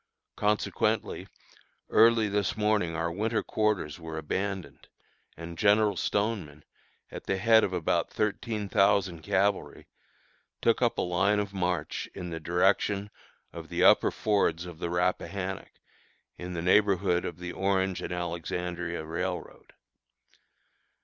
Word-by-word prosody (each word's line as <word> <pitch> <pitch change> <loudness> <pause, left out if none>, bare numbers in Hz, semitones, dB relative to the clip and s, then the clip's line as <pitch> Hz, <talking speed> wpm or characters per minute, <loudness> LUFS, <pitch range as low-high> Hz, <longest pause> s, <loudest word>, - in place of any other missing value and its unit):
Consequently, 105 0 0 0.6
early 115 -1 +5
this 100 -2 -1
morning 105 -6 +1
our 85 0 -1
winter 110 +5 -1
quarters 105 -8 -1
were 80 -1 -7
abandoned, 95 -1 -4 0.5
and 85 0 -8
General 105 0 +4
Stoneman, 95 -8 -2 0.5
at - - -8
the 95 - 0
head 110 +3 +5
of 95 - 0
about 90 -4 0
thirteen 105 0 -2
thousand 95 -4 +2
cavalry, 100 +5 0 0.7
took 115 +1 +2
up 120 -2 +2
a - - +1
line 95 +4 +2
of 100 -1 -3
march 90 -2 -2
in 90 -1 -6
the 80 - -4
direction 95 +4 +1 0.4
of - - -9
the - - 0
upper - - +6
fords 95 -5 0
of 85 -2 -10
the 85 - -3
Rappahannock, 90 +2 -2 0.6
in 90 0 -7
the 85 - -3
neighborhood 95 -2 +3
of 85 - -5
the 90 0 -6
Orange 95 0 0
and - - -5
Alexandria 85 -1 -3
Railroad. 85 +2 -5
95 Hz, 130 wpm, -28 LUFS, 85-105 Hz, 0.7 s, upper